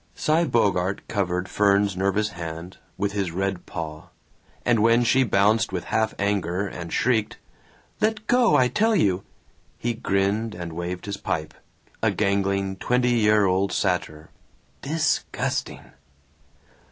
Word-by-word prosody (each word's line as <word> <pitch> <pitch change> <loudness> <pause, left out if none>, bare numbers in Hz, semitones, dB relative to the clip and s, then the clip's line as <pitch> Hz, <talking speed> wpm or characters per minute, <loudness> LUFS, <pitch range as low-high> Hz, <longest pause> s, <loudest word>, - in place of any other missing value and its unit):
Cy 160 +3 +2
Bogart 100 - 0
covered 90 -3 -1
Fern's 100 -1 +2
nervous 100 +3 0
hand 85 -1 -7 0.2
with 100 0 -1
his 100 -3 -1
red 95 +1 -3
paw, 80 -2 -6 0.6
and 120 -3 +3
when 115 +2 +4
she 130 +3 +3
bounced 110 -1 +2
with 90 -2 -3
half 110 +4 0
anger 100 -2 0
and 85 -3 -7
shrieked, 110 -4 +1 0.6
"Let 215 0 0
go, 240 -8 +4
I 130 -2 +4
tell 220 - +2
you!" 95 - +2 0.5
he 120 0 -1
grinned 105 +1 -1
and 85 -2 -6
waved 90 +2 -5
his 100 -1 -4
pipe 80 0 -3 0.5
a - - +3
gangling 100 -1 0
twenty 125 +2 +1
year 105 -3 +4
old 95 +1 +1
satyr. 90 -5 -2 0.5
"Disgusting!" 155 +2 -2
100 Hz, 130 wpm, -24 LUFS, 90-115 Hz, 0.6 s, when